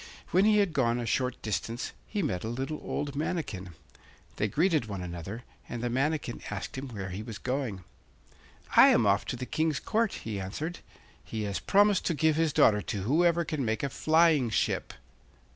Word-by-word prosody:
When 185 Hz, +3 st, +4 dB
he 215 Hz, 0 st, +5 dB
had 200 Hz, -5 st, +2 dB
gone 120 Hz, -4 st, +2 dB
a 120 Hz, -, -3 dB
short 125 Hz, +3 st, 0 dB
distance 115 Hz, +2 st, -3 dB, 0.2 s
he 205 Hz, -3 st, -2 dB
met 90 Hz, -, -2 dB
a -, -, -3 dB
little 135 Hz, +6 st, -3 dB
old 145 Hz, -1 st, -3 dB
manikin. 135 Hz, -, -3 dB, 0.6 s
They 105 Hz, -, +1 dB
greeted 155 Hz, -, +1 dB
one 100 Hz, -3 st, -5 dB
another, 90 Hz, +7 st, -6 dB, 0.3 s
and 120 Hz, -1 st, -5 dB
the 120 Hz, -, -1 dB
manikin 135 Hz, -1 st, -1 dB
asked 105 Hz, -2 st, -5 dB
him 135 Hz, +1 st, -5 dB
where 100 Hz, -5 st, -5 dB
he 95 Hz, +4 st, -5 dB
was 110 Hz, -1 st, -7 dB
going. 125 Hz, -6 st, -3 dB, 0.9 s
'I -, -, +9 dB
am 115 Hz, -, +4 dB
off 100 Hz, 0 st, +3 dB
to -, -, -3 dB
the 125 Hz, +1 st, -5 dB
King's 155 Hz, +2 st, 0 dB
Court,' 225 Hz, -1 st, 0 dB
he 105 Hz, -3 st, -5 dB
answered. 150 Hz, -, -4 dB, 0.4 s
'He 110 Hz, -1 st, -4 dB
has 100 Hz, -2 st, -2 dB
promised 205 Hz, -1 st, +4 dB
to 170 Hz, -, +1 dB
give 155 Hz, +1 st, +3 dB
his 160 Hz, -1 st, +2 dB
daughter 105 Hz, -6 st, +4 dB
to 100 Hz, -3 st, -4 dB
whoever 170 Hz, -, +3 dB
can 150 Hz, -4 st, -2 dB
make 110 Hz, 0 st, -1 dB
a 140 Hz, -, 0 dB
flying 155 Hz, -3 st, +3 dB
ship. 110 Hz, -, -1 dB
130 Hz, 190 wpm, -29 LUFS, 105-160 Hz, 0.9 s, I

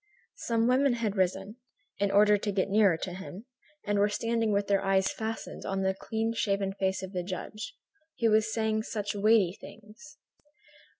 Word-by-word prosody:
Some 230 Hz, -, 0 dB
women 260 Hz, +1 st, +3 dB
had 225 Hz, -4 st, -2 dB
risen, 195 Hz, +3 st, -1 dB, 0.4 s
in 200 Hz, 0 st, +1 dB
order 210 Hz, +1 st, +5 dB
to 205 Hz, 0 st, -2 dB
get 195 Hz, 0 st, 0 dB
nearer 200 Hz, -5 st, +4 dB
to 180 Hz, +2 st, -5 dB
him, 190 Hz, +3 st, -9 dB, 0.4 s
and 205 Hz, -1 st, +1 dB
were 205 Hz, +1 st, +3 dB
standing 230 Hz, +1 st, 0 dB
with 200 Hz, 0 st, +1 dB
their 195 Hz, -1 st, +1 dB
eyes 195 Hz, -1 st, +2 dB
fastened 220 Hz, 0 st, -5 dB
on 195 Hz, 0 st, -2 dB
the 190 Hz, 0 st, +1 dB
clean 225 Hz, +3 st, -2 dB
shaven 200 Hz, -3 st, -1 dB
face 190 Hz, -1 st, -1 dB
of 190 Hz, -, -6 dB
the 180 Hz, -, -1 dB
judge, 205 Hz, -, -6 dB, 0.4 s
who 230 Hz, -2 st, +3 dB
was 220 Hz, +1 st, +3 dB
saying 220 Hz, -1 st, 0 dB
such 210 Hz, -2 st, -4 dB
weighty 205 Hz, -3 st, +3 dB
things. 225 Hz, +9 st, -14 dB
205 Hz, 175 wpm, -29 LUFS, 195-225 Hz, 0.4 s, order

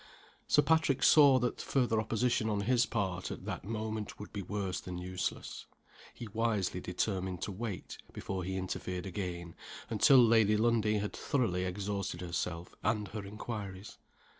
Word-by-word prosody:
Sir 150 Hz, -, +5 dB
Patrick 160 Hz, -3 st, +2 dB
saw 140 Hz, -4 st, +8 dB
that 125 Hz, -1 st, -1 dB
further 120 Hz, -5 st, +1 dB
opposition 115 Hz, 0 st, +1 dB
on 105 Hz, -1 st, 0 dB
his 120 Hz, +3 st, +3 dB
part, 95 Hz, -5 st, -2 dB
at -, -, -7 dB
that -, -, -4 dB
moment, 110 Hz, +1 st, -4 dB
would 105 Hz, -, -9 dB
be 100 Hz, -, -3 dB
worse 100 Hz, -1 st, -3 dB
than 90 Hz, -1 st, -6 dB
useless. 90 Hz, +1 st, -4 dB, 0.4 s
He 120 Hz, -, -8 dB
wisely 105 Hz, -4 st, 0 dB
determined 95 Hz, 0 st, -2 dB
to -, -, -3 dB
wait, 100 Hz, -1 st, -5 dB
before 95 Hz, -1 st, -4 dB
he 95 Hz, +1 st, -3 dB
interfered 90 Hz, -1 st, -4 dB
again, 90 Hz, -3 st, -4 dB, 0.4 s
until 115 Hz, +5 st, +6 dB
Lady 110 Hz, -3 st, +6 dB
Lundie 110 Hz, -1 st, +2 dB
had 105 Hz, 0 st, -2 dB
thoroughly 105 Hz, -, 0 dB
exhausted 100 Hz, -1 st, -3 dB
herself 85 Hz, -1 st, -3 dB
and 105 Hz, -2 st, 0 dB
her 110 Hz, -2 st, -5 dB
inquiries. 100 Hz, -1 st, -7 dB
105 Hz, 150 wpm, -32 LUFS, 95-115 Hz, 0.4 s, saw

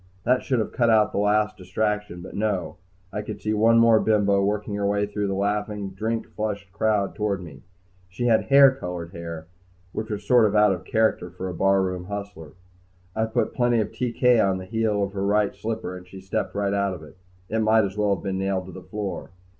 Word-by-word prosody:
That 125 Hz, +4 st, +2 dB
should 130 Hz, -, 0 dB
have 110 Hz, -, -1 dB
cut 120 Hz, -2 st, +2 dB
out 110 Hz, -1 st, +4 dB
the -, -, -1 dB
last 105 Hz, +1 st, +2 dB
distraction. 105 Hz, 0 st, -2 dB
But -, -, -10 dB
no, 100 Hz, -4 st, -2 dB, 0.4 s
I 105 Hz, -, -2 dB
could 105 Hz, -, -7 dB
see 110 Hz, -, -1 dB
one 115 Hz, +2 st, +4 dB
more 115 Hz, -1 st, +6 dB
bimbo 100 Hz, -3 st, +2 dB
working 105 Hz, +1 st, -1 dB
her 100 Hz, 0 st, -1 dB
way 100 Hz, 0 st, +1 dB
through 105 Hz, 0 st, -3 dB
the 95 Hz, -, -1 dB
laughing, 105 Hz, 0 st, -2 dB
drink 110 Hz, +4 st, -2 dB
flushed 100 Hz, -2 st, -4 dB
crowd 100 Hz, 0 st, 0 dB
toward 105 Hz, -2 st, -1 dB
me. 75 Hz, -7 st, -11 dB, 0.5 s
She 95 Hz, +7 st, -4 dB
had 115 Hz, -2 st, +3 dB
hair 140 Hz, -1 st, +7 dB
colored 90 Hz, -9 st, -6 dB
hair, 85 Hz, -2 st, -7 dB, 0.5 s
which 110 Hz, +3 st, -5 dB
was 105 Hz, -1 st, -4 dB
sort 120 Hz, -1 st, +5 dB
of 105 Hz, -, -2 dB
out 105 Hz, -1 st, +5 dB
of 90 Hz, 0 st, -7 dB
character 110 Hz, -4 st, +1 dB
for 90 Hz, +1 st, -6 dB
a -, -, -5 dB
barroom 95 Hz, 0 st, +1 dB
hustler. 100 Hz, -6 st, -7 dB, 0.6 s
I 110 Hz, -, +1 dB
put 110 Hz, -, -1 dB
plenty 120 Hz, -1 st, +2 dB
of 110 Hz, -, -1 dB
TK 125 Hz, -1 st, +2 dB
on 95 Hz, -1 st, +1 dB
the 95 Hz, -, -7 dB
heel 105 Hz, 0 st, 0 dB
of 100 Hz, 0 st, -3 dB
her 100 Hz, -1 st, -2 dB
right 105 Hz, +1 st, +2 dB
slipper, 110 Hz, -4 st, -4 dB
and 90 Hz, 0 st, -11 dB
she 95 Hz, +1 st, -11 dB
stepped 95 Hz, +1 st, -3 dB
right 100 Hz, -1 st, 0 dB
out 100 Hz, -1 st, 0 dB
of 80 Hz, -, -11 dB
it. 75 Hz, -, -14 dB, 0.3 s
It 110 Hz, -, -1 dB
might 110 Hz, 0 st, +4 dB
as 95 Hz, 0 st, -5 dB
well 105 Hz, -1 st, +2 dB
have -, -, -11 dB
been 95 Hz, -1 st, -2 dB
nailed 95 Hz, -1 st, -1 dB
to 95 Hz, -, -9 dB
the 95 Hz, -, -9 dB
floor. 100 Hz, -1 st, -5 dB
100 Hz, 220 wpm, -24 LUFS, 95-110 Hz, 0.6 s, hair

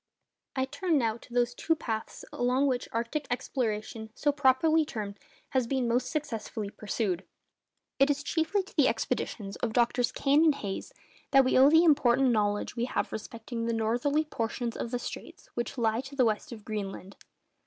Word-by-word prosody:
I 260 Hz, -1 st, +1 dB
turn 340 Hz, +3 st, 0 dB
now 225 Hz, -4 st, +1 dB
to 240 Hz, -, -18 dB
those 245 Hz, 0 st, +1 dB
two 325 Hz, +6 st, +1 dB
paths 220 Hz, -7 st, -5 dB
along 250 Hz, +3 st, +2 dB
which 255 Hz, -3 st, 0 dB
arctic 235 Hz, +6 st, -2 dB
exploration, 225 Hz, -3 st, -2 dB, 0.3 s
properly 290 Hz, +3 st, +4 dB
so -, -, 0 dB
termed, 205 Hz, -5 st, -5 dB, 0.3 s
has 260 Hz, -3 st, +1 dB
been 260 Hz, -1 st, 0 dB
most 245 Hz, +2 st, +1 dB
successfully 225 Hz, -8 st, -4 dB
pursued. 205 Hz, -3 st, -2 dB, 0.8 s
It 275 Hz, +1 st, +5 dB
is 290 Hz, 0 st, 0 dB
chiefly 330 Hz, +6 st, 0 dB
to 380 Hz, -, -17 dB
the 290 Hz, -5 st, +5 dB
expeditions 220 Hz, -3 st, -2 dB
of 225 Hz, -2 st, -2 dB
Drs. 240 Hz, +1 st, +2 dB
Kane 285 Hz, +3 st, +3 dB
and 310 Hz, -3 st, +5 dB
Hayes 200 Hz, -7 st, -5 dB, 0.4 s
that 270 Hz, -1 st, +6 dB
we 255 Hz, -, +2 dB
owe 265 Hz, +2 st, +8 dB
the 320 Hz, +2 st, +6 dB
important 270 Hz, -5 st, +4 dB
knowledge 205 Hz, -1 st, 0 dB
we 235 Hz, 0 st, 0 dB
have -, -, -2 dB
respecting 230 Hz, +1 st, -5 dB
the 230 Hz, -, 0 dB
northerly 245 Hz, +7 st, +1 dB
portions 235 Hz, -3 st, -3 dB
of -, -, -3 dB
the 245 Hz, -, -1 dB
straits -, -, -8 dB
which 240 Hz, +3 st, -3 dB
lie 225 Hz, 0 st, +1 dB
to 270 Hz, +1 st, -10 dB
the 255 Hz, -3 st, +4 dB
west 215 Hz, +1 st, -1 dB
of 220 Hz, -3 st, -9 dB
Greenland. 200 Hz, -2 st, -5 dB
245 Hz, 175 wpm, -29 LUFS, 225-275 Hz, 0.8 s, owe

